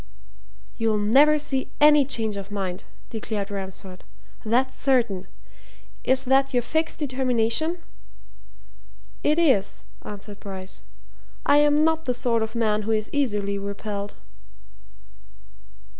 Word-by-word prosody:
"You'll 225 -2 +1
never 270 +9 +5
see 270 -3 -2
any 295 -1 +6
change 225 -6 -1
of 200 0 -6
mind," 190 -3 -4 0.3
declared 210 -2 -4
Ransford. 190 -1 -7 0.4
"That's 250 +4 +1
certain. 235 -9 +1 0.8
Is 260 0 +2
that 270 +1 +2
your 245 - +2
fixed 315 +6 -1
determination?" 260 +3 0 1.4
"It 300 +2 +2
is," 270 - +2 0.2
answered 205 0 -9
Bryce. 190 -1 -8 0.6
"I'm 295 +1 +4
not 320 0 +1
the 250 - 0
sort 235 -2 0
of 220 +1 -3
man 215 -2 +1
who 220 +2 -3
is 215 -1 -1
easily 205 -8 0
repelled." 200 0 -5
230 Hz, 115 wpm, -24 LUFS, 205-275 Hz, 1.4 s, any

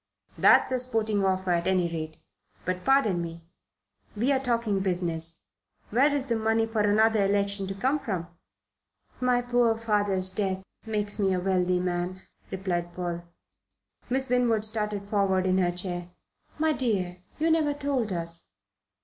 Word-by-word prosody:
"That's - - +5
a 255 - +1
sporting 220 -5 +1
offer, 190 -1 0
at 170 -1 +1
any 185 -2 +2
rate. 160 -2 -5 0.5
But, 185 0 -2
pardon 245 -10 +3
me 165 0 -7 0.7
we're 260 +6 +2
talking 235 -6 0
business 170 -3 -1 0.5
where 270 +7 +4
is 285 -2 -1
the 235 -4 0
money 225 0 +1
for 225 -1 -3
another 215 +1 +3
election 200 0 +1
to 195 - -4
come 265 +9 +1
from?" 190 - -4 0.9
"My 250 -1 +2
poor 240 -2 +2
father's 205 -4 +1
death 190 -2 -2 0.2
makes 210 -1 -1
me 195 -2 +2
a - - 0
wealthy 180 -1 +1
man," 180 +1 -3 0.3
replied 175 -2 -3
Paul. 175 -1 -4 0.8
Miss 265 +1 +2
Winwood 240 -4 +2
started 210 -2 -1
forward 195 -3 +1
in 185 0 +2
her 180 -1 +2
chair. 175 -1 -3 0.5
"My 315 0 +2
dear, 185 -9 -1 0.2
you 320 +2 +2
never 305 -3 +2
told 275 -7 -1
us." 170 -1 -1
200 Hz, 150 wpm, -27 LUFS, 180-230 Hz, 0.9 s, That's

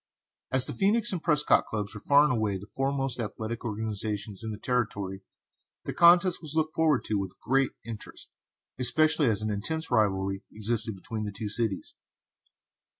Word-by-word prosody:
As 130 -1 +5
the - - -1
Phœnix 215 +4 +2
and 180 -4 -3
Prescott 150 -3 +3
clubs 105 -1 -4
were 105 - -9
far 145 +1 +5
and 150 - +2
away 110 -4 -1
the 95 - -10
foremost 135 -2 -1
athletic 110 +1 -5
organizations 105 -2 -4
in 110 - -4
the 105 - -5
Territory, 100 -6 -2 0.6
the - - -4
contest 175 +1 +5
was 155 -2 -3
looked 155 -1 0
forward 155 -5 +2
to 105 -2 -1
with 95 -2 -5
a - - -33
great 135 +1 +1
interest, 115 -2 -9 0.5
especially 150 +4 +4
as 110 -2 0
an 110 - -1
intense 160 +11 -2
rivalry 95 -4 +1
existed 110 0 -1
between 110 +3 -6
the 105 - -4
two 105 +1 -5
cities. 105 -2 -2
115 Hz, 170 wpm, -27 LUFS, 105-145 Hz, 0.6 s, As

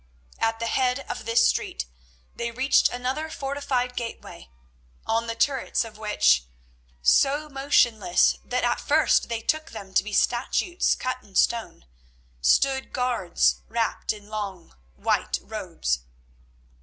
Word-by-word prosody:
At 225 0 0
the 230 - -2
head 250 +2 +1
of - - -6
this 230 +1 +4
street 60 - -1 0.5
they 235 0 -3
reached 260 +4 +3
another 260 +6 -3
fortified 270 -4 -2
gateway, 230 - -7 0.6
on 230 +1 0
the 230 - -3
turrets 265 0 +1
of 215 -1 -12
which, 65 - +3 0.6
so 280 - +3
motionless 240 -9 +2
that 250 0 -2
at 240 0 +1
first 305 -3 +3
they 230 -1 -2
took 310 +1 0
them 195 -1 -9
to - - +4
be 215 - -7
statues 255 - +1
cut 255 0 -3
in 195 -5 -20
stone, 230 - +1 0.6
stood 265 - +2
guards 245 -9 +1
wrapped 230 -1 -1
in 210 -1 -9
long 200 -5 -6 0.2
white - - 0
robes. - - -3
235 Hz, 130 wpm, -25 LUFS, 210-265 Hz, 0.6 s, this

